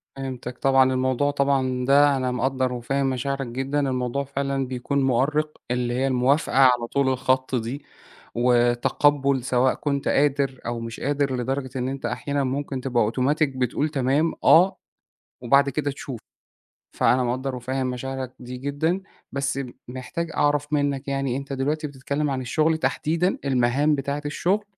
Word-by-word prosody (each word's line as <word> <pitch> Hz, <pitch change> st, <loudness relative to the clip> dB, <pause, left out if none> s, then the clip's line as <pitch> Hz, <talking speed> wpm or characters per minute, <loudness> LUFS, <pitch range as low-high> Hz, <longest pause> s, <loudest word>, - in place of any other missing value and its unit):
فهمتك 130 Hz, -2 st, -6 dB
طبعًا. 135 Hz, -1 st, +4 dB
الموضوع 130 Hz, +2 st, +1 dB
طبعًا 135 Hz, -3 st, 0 dB
ده 140 Hz, 0 st, +5 dB
أنا 130 Hz, -1 st, -1 dB
مقدّر 130 Hz, 0 st, 0 dB
وفاهم 135 Hz, +3 st, -1 dB
مشاعرك 135 Hz, +1 st, -2 dB
جدًا، 135 Hz, +4 st, -2 dB
الموضوع 130 Hz, +1 st, -1 dB
فعلًا 135 Hz, -1 st, -2 dB
بيكون 130 Hz, +2 st, -1 dB
مؤرِّق 150 Hz, +4 st, +1 dB
اللي 125 Hz, -1 st, 0 dB
هي 130 Hz, +2 st, +1 dB
الموافقة 130 Hz, +4 st, +1 dB
على 125 Hz, -3 st, +5 dB
طول 140 Hz, +2 st, +1 dB
الخط 130 Hz, 0 st, 0 dB
دي 125 Hz, +4 st, -3 dB, 0.5 s
وتقبُّل 125 Hz, +3 st, +2 dB
سواء 130 Hz, +1 st, +2 dB
كنت 140 Hz, -2 st, -2 dB
قادر 140 Hz, -2 st, +1 dB
أو 120 Hz, 0 st, -3 dB
مش 115 Hz, 0 st, -7 dB
قادر 140 Hz, -2 st, 0 dB
لدرجة 130 Hz, +2 st, -2 dB
إن 125 Hz, 0 st, -1 dB
أنت 135 Hz, 0 st, -5 dB
أحيانًا 140 Hz, -1 st, -2 dB
ممكن 135 Hz, 0 st, -3 dB
تبقى 125 Hz, -3 st, +1 dB
أوتوماتيك 135 Hz, +7 st, +1 dB
بتقول 130 Hz, +4 st, 0 dB
تمام، 145 Hz, +3 st, +1 dB
آه، 185 Hz, +3 st, +6 dB, 0.6 s
وبعد 140 Hz, +3 st, +4 dB
كده 145 Hz, +1 st, -1 dB
تشوف. 135 Hz, -3 st, -7 dB, 0.8 s
فأنا 125 Hz, +1 st, +3 dB
مقدّر 130 Hz, +2 st, -2 dB
وفاهم 130 Hz, +1 st, -2 dB
مشاعرك 130 Hz, 0 st, -5 dB
دي 125 Hz, 0 st, -7 dB
جدًا، 145 Hz, +7 st, -1 dB, 0.3 s
بس 140 Hz, 0 st, -2 dB, 0.3 s
محتاج 130 Hz, +7 st, -5 dB
أعرف 145 Hz, 0 st, +1 dB
منّك 140 Hz, -1 st, 0 dB
يعني 135 Hz, -2 st, -1 dB
أنت 140 Hz, 0 st, -6 dB
دلوقتي 150 Hz, +3 st, -1 dB
بتتكلِّم 140 Hz, +2 st, -3 dB
عن 130 Hz, -1 st, -2 dB
الشُغل 155 Hz, +6 st, +1 dB
تحديدًا، 165 Hz, +4 st, 0 dB
المهام 135 Hz, +3 st, +2 dB
بتاعة 140 Hz, +1 st, -3 dB
الشُغل؟ 185 Hz, +8 st, 0 dB
135 Hz, 150 wpm, -24 LUFS, 125-145 Hz, 0.8 s, آه